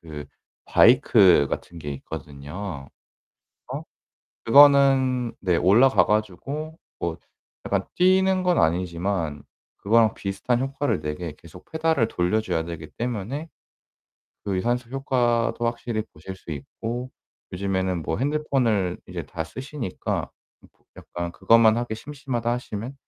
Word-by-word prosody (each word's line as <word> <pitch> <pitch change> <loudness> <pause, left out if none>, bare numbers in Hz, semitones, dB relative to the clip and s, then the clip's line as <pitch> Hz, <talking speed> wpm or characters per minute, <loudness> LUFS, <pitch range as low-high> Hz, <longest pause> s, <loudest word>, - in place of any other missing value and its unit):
그 75 -3 -8 0.4
바이크 100 - +5
같은 85 - -5
게 75 -2 -6
있거든요. 70 +3 -7 0.8
어? - - -4 0.6
그거는 135 -2 +5
네 90 -3 +1
올라가 105 +1 +5
가지고 135 - -2 0.2
뭐 85 -1 -2 0.5
약간 - - 0
뛰는 185 +1 +3
건 180 -1 +2
아니지만 85 -2 0 0.3
그거랑 110 +1 +3
비슷한 110 +5 -2
효과를 135 - -1
내게 75 +1 -4
계속 85 +2 -15
페달을 160 -7 +1
돌려 90 +5 +1
줘야 80 -7 -2
되기 85 -2 -7
때문에 120 - -4 1.0
그 100 -2 -1
유산소 120 +5 -1
효과도 120 -3 0
확실히 115 -2 -2
보실 95 +5 -8
수 90 - -12
있고 115 - -5 0.4
요즘에는 95 -1 -1
뭐 80 - -2
핸드폰을 125 -10 0
이제 - - -5
다 80 - -4
쓰시니까 130 - -4 0.3
음 - - -19
보 - - -37
약간 85 0 -6
그것만 115 +1 +5
하기 120 -2 -3
심심하다 130 -2 -4
하시면 120 +1 -5
110 Hz, 270 characters per minute, -24 LUFS, 90-130 Hz, 1.0 s, 바이크